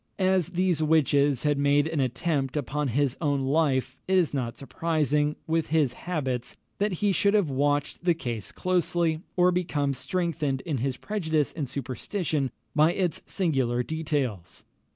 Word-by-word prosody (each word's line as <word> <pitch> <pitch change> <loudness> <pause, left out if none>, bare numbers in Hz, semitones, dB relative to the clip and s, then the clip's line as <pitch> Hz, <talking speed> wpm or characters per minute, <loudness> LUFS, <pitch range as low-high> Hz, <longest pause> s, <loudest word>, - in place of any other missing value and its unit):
As 185 -3 +2
these 180 -2 0
witches 145 -4 +3
had 145 -1 +2
made 145 +1 +3
an 160 -1 -2
attempt 135 +2 -1
upon 145 +2 -1
his 135 +1 +1
own 145 -3 +1
life, 135 -2 +1
it 190 0 +3
is 175 -5 +2
not 125 -4 -2
surprising, 150 0 0
with 165 0 0
his 150 -5 +2
habits, 130 -9 -3 0.2
that 205 +1 +1
he 205 - +4
should 200 +2 +2
have 190 -9 +2
watched 145 +3 0
the 175 -1 +3
case 120 - -5
closely, 175 -3 0 0.2
or 180 0 +5
become 160 -6 0
strengthened 145 0 -2
in 145 -4 -2
his 130 +1 -1
prejudice 160 -8 -1
and 145 -6 -4
superstition 140 - -2 0.3
by 155 +3 +5
its 180 -3 -1
singular 135 - 0
details. 135 - -3
150 Hz, 150 wpm, -27 LUFS, 135-170 Hz, 0.3 s, or